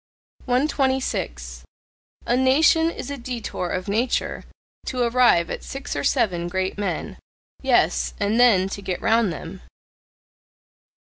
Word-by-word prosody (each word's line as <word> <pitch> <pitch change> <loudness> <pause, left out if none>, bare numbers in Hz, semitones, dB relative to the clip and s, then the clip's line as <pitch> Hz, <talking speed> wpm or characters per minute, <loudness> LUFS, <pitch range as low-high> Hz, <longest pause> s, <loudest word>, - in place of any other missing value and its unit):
126. 250 - -1 0.6
A 240 - +1
nation 310 +5 +4
is 310 - -6
a 280 - -5
detour 235 -7 -4
of 185 +2 -3
nature 225 +5 -1 0.4
to 250 -1 -1
arrive 235 -8 +3
at - - -5
six 275 +1 -6
or 140 - -2
seven 175 -1 +1
great 190 +1 -2
men. 195 -5 -4 0.4
Yes, - - +2
and 215 +4 +1
then 210 -7 +5
to 200 - -6
get 190 -2 -3
round 225 -3 +2
them. 165 +4 -8
215 Hz, 125 wpm, -23 LUFS, 180-255 Hz, 0.6 s, then